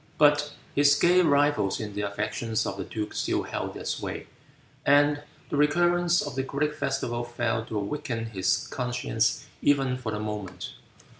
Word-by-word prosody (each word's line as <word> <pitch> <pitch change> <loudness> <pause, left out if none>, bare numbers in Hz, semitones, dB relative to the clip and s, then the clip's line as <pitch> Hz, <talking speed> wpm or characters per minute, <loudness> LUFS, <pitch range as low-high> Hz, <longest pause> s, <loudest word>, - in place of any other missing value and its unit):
But 145 0 +4 0.2
his 145 0 +5
gay 175 +4 +5
rivals 145 - +2
in 105 -2 -5
the 105 - -3
affections 105 +2 -2
of - - -3
the 100 - -4
duke 105 +2 -5
still - - 0
held - - -4
their - - -7
sway, - - -3 0.6
and 145 +1 +4 0.3
the - - 0
recurrence 175 +4 +3
of 145 - -5
the 135 - -1
great 140 +3 -1
festival 120 -5 -2
failed 120 -1 -2
to 110 - -3
awaken 115 +2 -3
his 95 -2 +1
conscience 125 - -1 0.2
even 135 -3 +2
for 115 -3 -4
the 105 - -3
moment. 105 -3 -5
125 Hz, 160 wpm, -27 LUFS, 110-145 Hz, 0.6 s, his